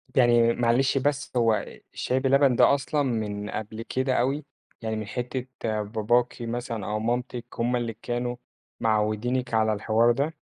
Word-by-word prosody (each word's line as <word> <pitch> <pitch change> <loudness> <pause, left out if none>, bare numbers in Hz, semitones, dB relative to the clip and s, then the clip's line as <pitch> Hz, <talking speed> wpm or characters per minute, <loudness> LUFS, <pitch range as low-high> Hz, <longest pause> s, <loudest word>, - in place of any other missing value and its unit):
يعني 120 -2 +5
معلش 120 +3 +2
بس 140 0 0
هو 115 -3 +2 0.3
شاي 130 - 0
بلبن 135 -1 +4
ده - - +6
أصلًا 145 +1 -1
من 105 -4 -2
قبل 110 +1 -5
كده 130 +2 -1
أوي؟ 135 +4 0 0.4
يعني 110 -1 -2
من 110 -1 -4
حِتّة 125 +4 -4 0.3
باباكِ 115 +3 +1
مثلًا 120 -2 -4
أو 105 +1 -2
مامتِك 120 +1 -2
هُم 120 +2 0
اللي 120 -2 -2
كانوا 120 0 -2 0.4
معوّدينِك 110 +3 0
على 110 -1 +3
الحوار 110 +3 +3
ده؟ 140 +6 -1
120 Hz, 150 wpm, -26 LUFS, 110-130 Hz, 0.4 s, ده